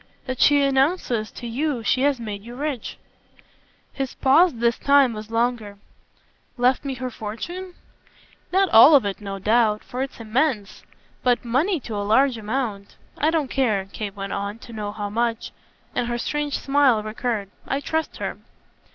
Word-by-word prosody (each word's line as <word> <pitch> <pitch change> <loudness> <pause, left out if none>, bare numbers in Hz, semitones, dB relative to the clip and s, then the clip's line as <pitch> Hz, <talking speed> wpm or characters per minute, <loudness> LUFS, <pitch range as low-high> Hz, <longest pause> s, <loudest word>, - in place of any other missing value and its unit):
"That 255 -2 -4
she 285 -1 +5
announces 270 -5 +1
to 240 - -8
you 255 +1 -2
she 245 +4 +1
has 280 -2 +2
made 210 -3 -5
you 235 +3 -10
rich." 280 -3 -4 1.0
His 270 -2 -4
pause 315 +7 +5
this 235 0 +1
time 280 -3 +4
was 215 0 -8
longer. 230 -3 -1 0.8
"Left 250 +3 +2
me 275 -2 -3
her 255 0 -5
fortune?" 345 - -6 0.8
"Not 380 +1 +3
all 265 +7 +9
of 265 - +5
it, 200 +1 -3
no 195 -1 -5
doubt, 215 +1 +2
for 250 - -5
it's 270 -2 -5
immense. 230 -2 -1 0.4
But 245 -1 +1
money 300 - +1
to 230 - -7
a 205 - -2
large 260 +1 +3
amount. 215 -3 -3 0.2
I 305 - +1
don't 315 -5 -1
care," 215 -8 +1
Kate 205 -2 -5
went 195 0 -5
on, 200 +2 -3
"to 235 - -11
know 210 -2 -4
how 205 -1 -5
much." 230 +1 -1 0.4
And 245 -1 -1
her 240 0 -2
strange 295 +4 -2
smile 275 -6 +3
recurred. 215 -2 -3 0.2
"I 275 - 0
trust 320 +2 -2
her." - - -4
240 Hz, 170 wpm, -23 LUFS, 215-275 Hz, 1.0 s, all